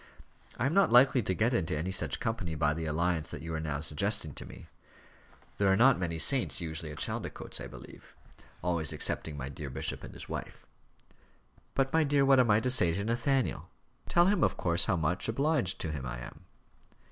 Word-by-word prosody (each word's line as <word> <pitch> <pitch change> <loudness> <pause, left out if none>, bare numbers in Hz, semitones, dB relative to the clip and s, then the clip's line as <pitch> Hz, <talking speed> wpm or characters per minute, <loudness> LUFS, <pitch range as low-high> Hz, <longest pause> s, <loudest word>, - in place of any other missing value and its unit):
"I 120 - -1
am 140 - 0
not 195 -6 +4
likely 125 +1 +6
to 95 - -1
get 115 +6 +1
into 80 -9 0
any 85 +5 -3
such 95 - -2
company 90 -8 -3
by 75 0 +1
the 80 +1 -4
alliance 85 +1 -1
that - - -8
you 80 0 -5
are 80 - -2
now 75 -3 -3
suggesting 75 -2 0
to - - -8
me. - - -12 0.9
There 100 -1 +3
are - - +4
not 125 +1 +5
many 85 -2 -2
saints 130 +9 +3
usually 80 -2 -5
at 75 - -9
Chaldicotes, - - -3
I - - -6
believe; - - -13 0.5
always 85 -3 0
excepting 75 -2 -4
my 70 -2 -5
dear 70 +1 -7
bishop 65 +1 -4
and - - -10
his - - -10
wife." - - -7 1.1
"But, 135 0 0
my 160 0 +4
dear, 140 -1 +2
what 135 -1 +5
am 125 -2 +3
I 105 0 +5
to 125 +2 +1
say 90 -9 +6
to 100 +4 -2
Nathaniel?" 120 +4 -1 0.4
"Tell 175 0 +4
him, 200 +2 +2
of - - +1
course, 85 0 +2
how 95 - +1
much 85 +5 -1
obliged 135 - 0
to 80 - -3
him 75 -3 -5
I 65 0 -5
am." - - -11
90 Hz, 205 wpm, -30 LUFS, 80-125 Hz, 1.1 s, likely